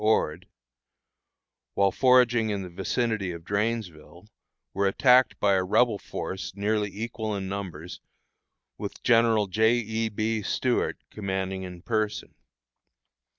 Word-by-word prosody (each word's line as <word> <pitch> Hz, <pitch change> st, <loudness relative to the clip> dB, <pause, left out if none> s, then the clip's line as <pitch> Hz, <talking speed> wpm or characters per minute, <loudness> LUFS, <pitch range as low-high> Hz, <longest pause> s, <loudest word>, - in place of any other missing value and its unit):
Ord, 95 Hz, -5 st, +1 dB, 1.3 s
while 100 Hz, -1 st, +3 dB
foraging 125 Hz, -2 st, +4 dB
in 100 Hz, -2 st, -2 dB
the 90 Hz, -, -9 dB
vicinity 100 Hz, +1 st, -1 dB
of 85 Hz, -1 st, -9 dB
Drainesville, 100 Hz, -4 st, -3 dB, 0.5 s
were 100 Hz, 0 st, +1 dB
attacked 125 Hz, +4 st, +4 dB
by 100 Hz, -1 st, +3 dB
a 95 Hz, -1 st, +2 dB
Rebel 105 Hz, +3 st, +2 dB
force 95 Hz, 0 st, -6 dB
nearly 105 Hz, +1 st, 0 dB
equal 110 Hz, +1 st, -4 dB
in 95 Hz, -1 st, -4 dB
numbers, 90 Hz, -4 st, -6 dB, 0.8 s
with -, -, -7 dB
General 115 Hz, -2 st, +4 dB
J. 110 Hz, +4 st, +3 dB
E. 110 Hz, -1 st, -1 dB
B. 110 Hz, +1 st, -1 dB
Stuart 120 Hz, +4 st, 0 dB
commanding 95 Hz, -2 st, -3 dB
in 90 Hz, -1 st, -9 dB
person. 110 Hz, -2 st, -2 dB
105 Hz, 120 wpm, -26 LUFS, 95-115 Hz, 1.3 s, foraging